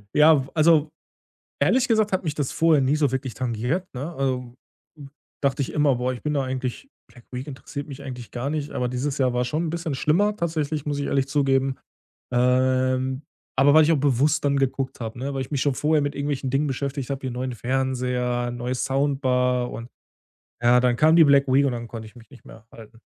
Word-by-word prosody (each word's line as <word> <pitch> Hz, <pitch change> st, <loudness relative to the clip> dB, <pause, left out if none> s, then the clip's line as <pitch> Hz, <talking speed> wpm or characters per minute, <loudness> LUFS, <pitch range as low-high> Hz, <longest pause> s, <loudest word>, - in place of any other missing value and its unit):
Ja, 150 Hz, -3 st, +5 dB
also, 155 Hz, -1 st, +4 dB, 0.7 s
ehrlich 255 Hz, 0 st, +3 dB
gesagt, 215 Hz, -3 st, +2 dB
hat 185 Hz, 0 st, 0 dB
mich 150 Hz, -2 st, -2 dB
das 145 Hz, -3 st, -2 dB
vorher 160 Hz, -4 st, +3 dB
nie 140 Hz, +3 st, +2 dB
so 145 Hz, -4 st, +2 dB
wirklich 130 Hz, -2 st, -3 dB
tangiert, 125 Hz, -, -2 dB
ne? 145 Hz, +7 st, -5 dB
Also, 125 Hz, -3 st, -2 dB, 0.4 s
u 140 Hz, -, -10 dB, 0.4 s
dachte 140 Hz, +1 st, +1 dB
ich -, -, -5 dB
immer: 145 Hz, -3 st, +3 dB
„Boah, 125 Hz, +1 st, -1 dB
ich 120 Hz, -, -8 dB
bin 150 Hz, 0 st, -1 dB
da 140 Hz, -, +1 dB
eigentlich 130 Hz, -, -4 dB, 0.2 s
Black 120 Hz, +1 st, -18 dB
Week 125 Hz, +3 st, -5 dB
interessiert 140 Hz, +1 st, -7 dB
mich 140 Hz, 0 st, -9 dB
eigentlich 125 Hz, -3 st, -8 dB
gar 125 Hz, +4 st, -3 dB
nicht“, 150 Hz, -2 st, -3 dB
aber 125 Hz, -1 st, -1 dB
dieses 135 Hz, +3 st, -3 dB
Jahr 130 Hz, -2 st, +2 dB
war 125 Hz, 0 st, +1 dB
schon 155 Hz, +7 st, -2 dB
'n -, -, -2 dB
bisschen 165 Hz, -3 st, -3 dB
schlimmer 205 Hz, +10 st, +1 dB
tatsächlich, 155 Hz, -4 st, -2 dB
muss 145 Hz, -1 st, -1 dB
ich 140 Hz, -, -2 dB
ehrlich 135 Hz, -1 st, 0 dB
zugeben. 135 Hz, -2 st, +1 dB, 0.6 s
Ähm, 130 Hz, +2 st, +1 dB, 0.3 s
aber 140 Hz, +2 st, +5 dB
weil 155 Hz, 0 st, +7 dB
ich 160 Hz, -, +3 dB
auch 155 Hz, -, +3 dB
bewusst 145 Hz, +2 st, +2 dB
dann 140 Hz, 0 st, +2 dB
geguckt 135 Hz, -1 st, -1 dB
habe, 115 Hz, 0 st, -6 dB
ne, 140 Hz, +2 st, -3 dB
weil 135 Hz, -, -2 dB
ich 130 Hz, -, -6 dB
mich 140 Hz, -3 st, -1 dB
schon 140 Hz, -1 st, +1 dB
vorher 150 Hz, 0 st, +2 dB
mit 145 Hz, 0 st, -2 dB
irgendwelchen 140 Hz, -2 st, -2 dB
Dingen 145 Hz, +2 st, +1 dB
beschäftigt 140 Hz, 0 st, -3 dB
habe, 135 Hz, 0 st, -3 dB
hier 130 Hz, -2 st, -4 dB
neuen 125 Hz, +1 st, -4 dB
Fernseher, 125 Hz, -1 st, -1 dB
neue 120 Hz, +1 st, -3 dB
Soundbar 130 Hz, -2 st, 0 dB
und 115 Hz, +2 st, -8 dB, 0.7 s
ja, 120 Hz, +1 st, +5 dB
dann 125 Hz, -1 st, +2 dB
kam 160 Hz, +4 st, +5 dB
die 165 Hz, -, +8 dB
Black 140 Hz, -1 st, +4 dB
Week 140 Hz, +2 st, +4 dB
und 130 Hz, -, 0 dB
dann 120 Hz, -1 st, -5 dB
konnte 110 Hz, -2 st, -8 dB
ich 110 Hz, -, -15 dB
mich 115 Hz, +2 st, -16 dB
nicht 130 Hz, -, -16 dB
mehr 110 Hz, 0 st, -14 dB
halten. 115 Hz, 0 st, -14 dB
135 Hz, 215 wpm, -24 LUFS, 125-145 Hz, 0.7 s, die